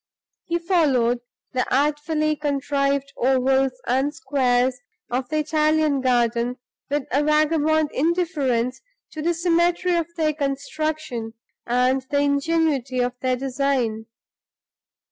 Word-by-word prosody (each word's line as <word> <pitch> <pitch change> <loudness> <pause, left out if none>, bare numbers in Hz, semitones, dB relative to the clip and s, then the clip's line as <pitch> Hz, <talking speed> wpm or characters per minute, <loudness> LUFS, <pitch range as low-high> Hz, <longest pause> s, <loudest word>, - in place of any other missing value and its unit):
He 340 0 0
followed 280 -9 +2 0.3
the 255 - -1
artfully 300 +3 +1
contrived 280 -1 -1
ovals 265 +1 +2
and 265 +4 +1
squares 255 -4 +1 0.3
of 250 +1 -2
the 310 - -1
Italian 305 -2 +2
garden 240 -1 +1 0.3
with 290 0 0
a 280 - +2
vagabond 310 0 +2
indifference 280 -7 0 0.3
to 310 - -6
the 340 +2 0
symmetry 345 +1 +2
of 335 -2 0
their 310 -1 +1
construction 285 -4 -3 0.3
and 250 +2 +2
the 285 - 0
ingenuity 285 -2 +1
of 245 0 0
their 255 -1 0
design. 250 -4 -1
280 Hz, 110 wpm, -23 LUFS, 255-310 Hz, 0.3 s, followed